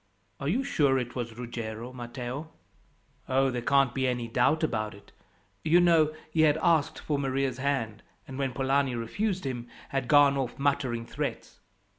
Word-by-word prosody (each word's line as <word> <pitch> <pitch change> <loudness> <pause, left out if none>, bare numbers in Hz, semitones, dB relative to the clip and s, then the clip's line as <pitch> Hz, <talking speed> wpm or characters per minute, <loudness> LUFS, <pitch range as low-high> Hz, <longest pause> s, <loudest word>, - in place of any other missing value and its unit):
"Are 140 - -3
you 240 - +1
sure 140 - +2
it 125 -2 -3
was 115 -2 -4
Ruggiero, 115 0 -6
Matteo?" 125 +4 -6 0.8
"Oh, 135 0 +3
there 125 -1 -3
can't 140 0 +3
be 130 -1 0
any 125 -2 -1
doubt 135 +7 +2
about 110 -8 -1
it. 100 - -17 0.5
You 170 +3 +5
know, 165 -3 +4 0.2
he 160 - +2
had 155 -1 +5
asked 160 -4 +2
for 145 -2 -2
Maria's 135 -2 -1
hand, 130 -6 -1 0.3
and 135 0 -7
when 135 -2 -1
Polani 135 0 +1
refused 185 - -2
him, 120 -3 -4 0.2
had 135 -2 -2
gone 145 -1 +6
off 125 -2 -3
muttering 135 -4 0
threats. - - -5
135 Hz, 165 wpm, -28 LUFS, 120-145 Hz, 0.8 s, gone